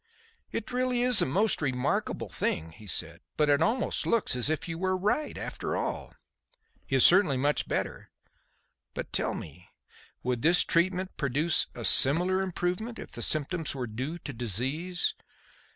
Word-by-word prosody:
"It 220 - -4
is - - -9
really 250 -1 0
a 245 -7 +7
most 200 +9 +2
remarkable 130 -3 -1
thing," 80 +1 -3
he 105 +5 -15
said, - - -1 0.2
"but 150 -1 +2
it 140 - +2
almost 245 +3 0
looks 230 - +2
as 125 +3 +2
if 155 +2 -2
you 165 -1 -5
were 185 0 0
right, 210 +11 -1
after - - -4
all. - - -4 0.7
He 135 - -1
is 130 - +6
certainly 180 -7 +5
much 145 +3 0
better. - - -4 0.9
But - - -6
tell - - 0
me, 85 +4 -10 0.5
would 125 -1 -2
this 170 +4 +5
treatment 185 +2 0
produce 145 +4 +1
a - - -5
similar 180 +7 +4
improvement 190 +5 -3
if - - -10
the - - -7
symptoms 155 +1 0
were 130 -2 -3
due 130 +9 -5
to 145 - -8
disease?" 130 - -2
165 Hz, 160 wpm, -28 LUFS, 130-185 Hz, 0.9 s, a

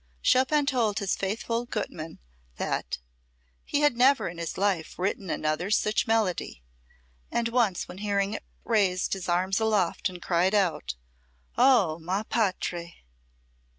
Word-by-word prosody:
Chopin 280 +3 +3
told 235 -7 +1
his 200 -3 0
faithful 230 +4 -2
Gutmann 165 -8 -5 0.4
that - - -2 0.7
"he 290 - -1
had 295 -4 +4
never 265 +3 +4
in 170 0 -7
his 170 - -4
life 190 -4 0
written 190 0 -2
another 155 +5 -1
such 215 +2 +1
melody," 205 - 0 0.7
and 235 -1 0
once 230 -6 +1
when 180 - -9
hearing 200 0 0
it - - -5 0.2
raised 195 -5 +1
his 190 -2 -4
arms 185 +3 +1
aloft 210 -4 +1
and 180 -1 -9
cried 180 +3 +1
out: 185 - 0 0.6
"Oh, 230 -11 +4
ma 185 +5 -2
patrie!" 180 - -2
200 Hz, 135 wpm, -27 LUFS, 180-225 Hz, 0.7 s, had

